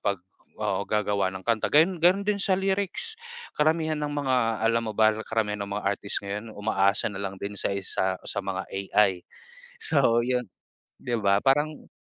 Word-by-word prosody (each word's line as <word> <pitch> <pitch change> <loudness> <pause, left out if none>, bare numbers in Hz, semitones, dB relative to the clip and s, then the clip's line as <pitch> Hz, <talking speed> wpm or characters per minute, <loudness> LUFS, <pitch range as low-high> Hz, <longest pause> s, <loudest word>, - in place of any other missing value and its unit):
pag 100 -1 0 0.4
oo - - -2
gagawa 100 -3 0
ng 95 - -7
kanta 115 0 +1
gayun, 165 +4 +4
ganun 180 +4 +4
din 205 0 0
sa 195 -1 +2
lyrics. 195 - -2 0.4
Karamihan 155 0 +2
ng 145 -1 -2
mga 115 -5 +1
alam 115 0 +2
mo 110 - -4
ba 110 +1 +5 0.2
karamihan 105 -2 -1
ng - - -10
mga 105 - -3
artist 100 +1 -2
ngayon 105 +3 -6
umaasa 100 -1 +1
na 95 - -7
lang 95 -1 -4
din 100 0 -4
sa 100 - 0
isa 95 -1 -1
sa - - -4
mga - - -2
AI. 95 -1 +1 0.5
So 130 -6 +3
yun, 125 +1 0 0.5
di 120 -2 -3
ba 100 -1 +2
parang 145 +3 +1
110 Hz, 175 wpm, -26 LUFS, 100-150 Hz, 0.5 s, ba